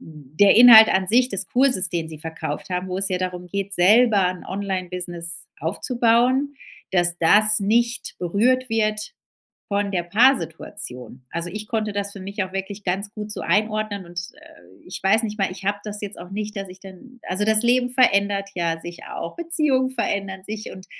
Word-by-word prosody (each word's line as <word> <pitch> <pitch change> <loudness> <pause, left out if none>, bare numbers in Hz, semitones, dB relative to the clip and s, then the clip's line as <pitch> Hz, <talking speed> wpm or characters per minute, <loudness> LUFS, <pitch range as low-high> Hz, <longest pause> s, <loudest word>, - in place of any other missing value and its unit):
der 155 +5 +1
Inhalt 225 -2 +10
an 190 0 +1
sich 250 +4 +3
des 195 -1 -2
Kurses, 250 -6 +2
den 165 -2 -3
sie 155 -2 -9
verkauft 160 -1 -6
haben, 180 0 -3
wo 185 +1 -3
es 195 - +1
ja 185 - -1
darum 180 -1 -4
geht, 200 +2 -4
selber 205 +2 +4
'n 180 -1 -6
Online-Business 180 -3 -5
aufzubauen, 240 - +1 0.4
dass 175 -2 +2
das 210 +5 +5
nicht 235 +4 0
berührt 240 +9 +1
wird 215 - -1 0.5
von 200 -1 -1
der 180 -3 -1
Paar-Situation. 175 - -1
Also 170 +1 -4
ich 210 +3 -7
konnte 215 -3 -2
das 200 0 -3
für 200 - -10
mich 200 +1 -4
auch 185 - -11
wirklich 195 +1 -6
ganz 195 +3 -2
gut 210 -1 -4
so - - -3
einordnen 215 +1 -1
und, 175 0 -6 0.2
äh, 90 +2 -19
ich 180 - -7
weiß 210 +4 +3
nicht 215 -1 -4
mal, 195 - 0
ich 190 +1 -10
habe 205 +1 0
das 210 -1 -5
jetzt 205 0 -6
auch 180 +2 -11
nicht, 210 +1 -5
dass 195 -1 -5
ich 185 +1 -13
dann 200 +7 -14
also, 190 +3 -1
das 220 +1 +3
Leben 245 +1 +2
verändert 200 -5 +2
ja 165 -2 -1
sich 175 0 -9
auch. 170 - -6
Beziehungen 300 -6 +1
verändern 195 -5 -3
sich, 215 +1 -7
und 185 - -12
200 Hz, 185 wpm, -22 LUFS, 180-220 Hz, 0.5 s, Inhalt